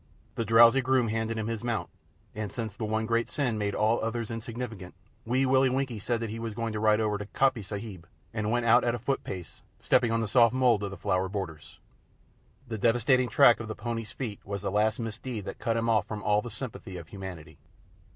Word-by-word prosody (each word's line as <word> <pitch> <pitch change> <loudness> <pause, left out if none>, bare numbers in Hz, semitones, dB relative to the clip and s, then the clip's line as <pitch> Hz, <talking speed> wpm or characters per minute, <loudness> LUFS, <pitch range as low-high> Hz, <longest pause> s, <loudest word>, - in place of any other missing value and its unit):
The 115 - -2
drowsy 115 +4 +7
groom 130 -2 +2
handed 110 +1 -1
him 110 - -2
his 115 0 -3
mount, 115 -8 -1 0.5
and, 105 -2 -4
since 110 -4 -5
the 110 - -3
one 110 +1 -1
great 115 +1 0
sin 125 -7 -1
made 100 -1 -1
all 110 +2 +2
others 115 0 -2
insignificant, 115 -5 -6 0.3
Wee 130 +3 +2
Willie 130 0 +4
Winkie 130 -3 -1
said 115 +3 -1
that 115 -2 -3
he 115 - -5
was 115 -2 -5
going 115 -1 -2
to 105 - -2
ride 110 0 +4
over 105 -2 0
to 105 - -6
Coppy 130 0 +1
Sahib, 100 -3 -7 0.3
and 105 -1 -2
went 120 +1 +1
out 120 +2 +6
at 120 0 +1
a - - -3
foot 135 +4 -2
pace, 90 -4 -8 0.2
stepping 120 - +2
on 115 - +1
the 115 - -1
soft 115 +1 +4
mould 125 -5 +3
of 100 - -2
the 100 - -8
flower 95 +1 0
borders. 95 -7 -6 0.9
The 110 -2 -4
devastating 120 +3 +3
track 130 -3 +6
of 115 - -6
the 110 - -5
pony's 115 0 -4
feet 110 -7 -5
was 100 0 -5
the 100 - -1
last 105 +1 +2
misdeed 115 -1 -5
that - - -7
cut 115 0 0
him 115 0 0
off 115 -2 +2
from 105 -1 -5
all 105 0 +3
sympathy 110 -5 -7
of 85 -2 -10
Humanity. 95 -5 -9
115 Hz, 220 wpm, -28 LUFS, 105-120 Hz, 0.9 s, drowsy